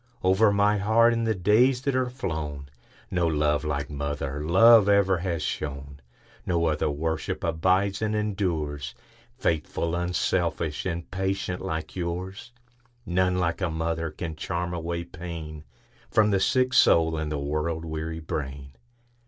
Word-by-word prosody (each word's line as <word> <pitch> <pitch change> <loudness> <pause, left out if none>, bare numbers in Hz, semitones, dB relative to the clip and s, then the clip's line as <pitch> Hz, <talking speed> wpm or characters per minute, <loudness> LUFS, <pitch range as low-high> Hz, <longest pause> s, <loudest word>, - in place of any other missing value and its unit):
Over 95 +3 +4
my 100 +1 +3
heart, 115 +3 +4
in 115 0 -1
the 110 -1 +1
days 120 +8 +3
that 140 -1 0
are 130 -1 +1
flown, 80 - -5 0.4
No 90 -2 +1
love 75 -1 +1
like 75 -1 -2
mother 70 0 -3
love 105 +5 +6
ever 100 -3 +3
has 85 -3 -2
shone; 70 -1 -5 0.4
No 85 -2 0
other 75 -1 +1
worship 80 +2 -3
abides 95 +5 +1
and 110 0 0
endures,—Faithful, 80 -4 -3
unselfish, 85 -2 -1
and 85 -1 -4
patient 95 -1 -2
like 80 -4 -4
yours:None 95 +2 -4
like 85 0 -1
a 95 - +1
mother 80 0 -2
can 80 +1 -6
charm 85 +2 -3
away 85 0 -3
painFrom 80 - -3
the 100 - +2
sick 130 +6 +2
soul 80 -1 +5
and 80 -1 -3
the 75 - -1
world 75 +3 -2
weary 80 0 -4
brain. 70 -3 -5
85 Hz, 135 wpm, -26 LUFS, 80-100 Hz, 0.4 s, love